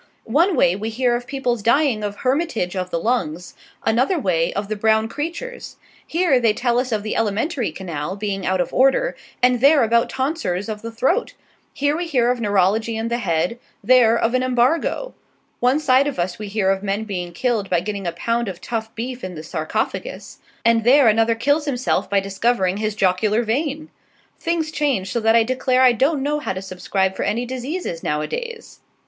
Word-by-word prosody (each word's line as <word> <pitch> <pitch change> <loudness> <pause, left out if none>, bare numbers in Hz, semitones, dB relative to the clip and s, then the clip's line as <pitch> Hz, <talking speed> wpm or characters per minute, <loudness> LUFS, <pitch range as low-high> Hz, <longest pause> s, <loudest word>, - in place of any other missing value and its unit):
One 340 +4 +4
way 175 - +3
we 215 +3 -4
hear 240 +1 +1
of 245 +1 -5
people's 250 -4 -1
dying 235 -1 +2
of 205 -1 -3
hermitage 255 - 0
of 185 -1 -3
the 170 - -1
lungs; 175 -5 -2 0.3
another 255 +11 +2
way, 175 - +1
of 200 +1 -3
the 215 - -2
brown 220 +1 +2
creatures; 335 - -6 0.3
here 330 -6 +2
they 230 -3 +3
tell 240 +1 +1
us 255 0 -2
of 215 -2 -1
the 215 - -3
elementary 225 - -1
canal 165 -1 -5
being 200 -2 -3
out 185 0 0
of 180 - -1
order, 270 - +3 0.3
and 250 -1 +4
there 280 0 +6
about 230 +1 +2
tonsors 260 - -2
of 210 -1 -5
the 230 - -6
throat; 270 - 0 0.4
here 285 +1 0
we 345 +1 -3
hear 245 -6 +2
of 245 -1 -3
neurology 210 +2 +1
in 225 +1 -2
the 235 +1 -1
head, 180 +3 -1 0.2
there, 235 0 +5
of 230 +1 0
an 255 - +2
embargo; 255 - 0 0.5
one 250 +4 +3
side 275 -2 +3
of 290 - -3
us 175 +2 -2
we 210 - -5
hear 195 -1 +1
of 195 0 -1
men 200 +2 -2
being 180 -5 -4
killed 215 +2 -1
by 175 - +2
getting 195 +1 -4
a - - 0
pound 230 +7 -1
of 185 -2 -6
tough 225 -1 -5
beef 250 +2 -5
in 185 -1 -5
the 155 - -7
sarcofagus, 175 - -4 0.3
and 230 -1 +4
there 255 +1 +6
another 225 +1 +3
kills 285 +6 +1
himself 255 -3 -1
by 200 0 +3
discovering 195 0 0
his 215 0 -2
jocular 205 +4 +2
vein. 290 +6 -2 0.5
Things 330 -2 -1
change 260 -13 -1
so 235 - 0
that 225 0 +3
I 230 - +6
declare 255 +1 +1
I 255 - +7
don't 270 +4 +1
know 295 +1 0
how 295 - -3
to 185 - -5
subscribe 190 0 -1
for - - -4
any 230 +4 -1
diseases 260 - -4
nowadays. 455 - -4
230 Hz, 195 wpm, -21 LUFS, 195-265 Hz, 0.5 s, I